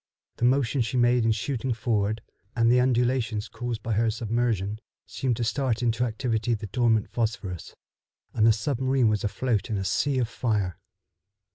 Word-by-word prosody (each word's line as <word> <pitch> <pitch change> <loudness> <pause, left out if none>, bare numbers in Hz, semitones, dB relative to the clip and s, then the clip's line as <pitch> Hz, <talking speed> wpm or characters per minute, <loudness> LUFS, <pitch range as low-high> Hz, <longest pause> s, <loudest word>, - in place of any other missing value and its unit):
The 120 - +1
motion 130 0 +2
she 120 +2 -1
made 120 -1 +3
in 115 - +3
shooting 125 +3 -1
forward, 110 -1 -1 0.3
and 115 0 +4
the 125 - +5
undulations 120 -3 +1
caused 115 -1 -5
by 115 - -3
her 115 +2 +2
submersion, 110 -2 -1 0.3
seemed 125 -4 -2
to 120 - -1
start 125 0 0
into 120 +1 +1
activity 115 0 -1
the 105 0 -6
dormant 110 +1 +1
phosphorus, 110 -7 -3 0.6
and 110 -1 +3
the - - +7
submarine 130 +1 +1
was 105 -1 0
afloat 110 +1 -1
in 110 - -1
a 95 - -3
sea 135 +9 +1
of 125 -3 +1
fire. 105 -6 -1
115 Hz, 165 wpm, -26 LUFS, 110-125 Hz, 0.6 s, the